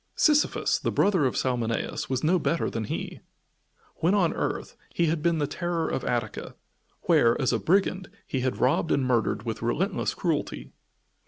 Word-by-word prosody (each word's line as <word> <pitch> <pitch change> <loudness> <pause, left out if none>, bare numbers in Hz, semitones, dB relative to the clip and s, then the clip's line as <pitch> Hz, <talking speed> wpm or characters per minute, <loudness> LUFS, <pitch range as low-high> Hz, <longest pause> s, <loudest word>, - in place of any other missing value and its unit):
Sisyphus, 300 -1 +2
the - - -1
brother 185 -9 +3
of 125 - -3
Salmoneus, 120 -3 -1
was 130 +1 -1
no 175 +4 +3
better 170 +1 0
than 115 -1 -3
he. - - -5 0.8
When 175 +5 +2
on 180 -5 +2
earth, - - -3
he 170 - 0
had 160 -1 0
been 170 0 +2
the 150 - +1
terror 170 +2 -2
of - - -2
Attica, - - -3 0.5
where, 115 0 +4
as 130 -3 +1
a 115 - +1
brigand, 185 - +1 0.2
he 135 - -2
had 130 0 -1
robbed 140 +5 +2
and 135 - +2
murdered 115 -4 +1
with 115 -2 -4
relentless 175 - -1
cruelty. 165 -4 -2
155 Hz, 170 wpm, -26 LUFS, 125-175 Hz, 0.8 s, where